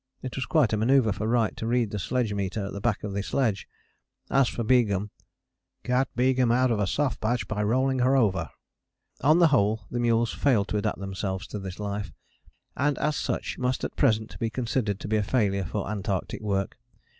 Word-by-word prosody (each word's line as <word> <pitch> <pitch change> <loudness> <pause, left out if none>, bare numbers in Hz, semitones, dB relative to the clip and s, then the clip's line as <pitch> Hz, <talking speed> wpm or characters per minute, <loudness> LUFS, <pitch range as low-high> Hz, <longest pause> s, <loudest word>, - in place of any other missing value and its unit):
It 130 - -5
was 130 - -3
quite 145 -9 +3
a - - +2
manoeuvre 115 -1 +3
for 105 +3 -3
Wright 115 -1 +1
to 110 - -3
read 120 -3 +1
the 105 - -3
sledge 115 +2 -1
meter 100 +1 -2
at 100 - -6
the 100 - -6
back 115 -3 0
of 105 -2 -4
the 100 - -1
sledge. 110 -2 -1 0.6
As 135 -2 +4
for 120 - -3
Begum: 105 -4 +2 0.7
"Got 125 +1 +1
Begum 125 -1 +3
out 125 +1 +3
of 110 - 0
a 100 - +1
soft 140 +3 -1
patch 120 +3 0
by 105 -1 -2
rolling 130 +5 +1
her 130 +2 +3
over." 95 - +1 0.7
On 155 +4 +5
the 170 -2 +6
whole 110 -5 +2
the 120 - -2
mules 115 -1 +2
failed 115 -8 +2
to 105 - 0
adapt 100 - -1
themselves 95 0 -4
to 105 - -5
this 95 0 -7
life, 100 -3 -4 0.6
and 140 0 +1
as 150 -1 0
such - - -3
must 125 0 -1
at - - -4
present 110 -5 +1
be 115 - 0
considered 115 -3 -1
to - - -5
be 110 +1 +1
a - - +2
failure 100 -3 +1
for 100 +2 -3
Antarctic 100 -1 -3
work. 100 -2 -2
110 Hz, 205 wpm, -26 LUFS, 100-125 Hz, 0.7 s, the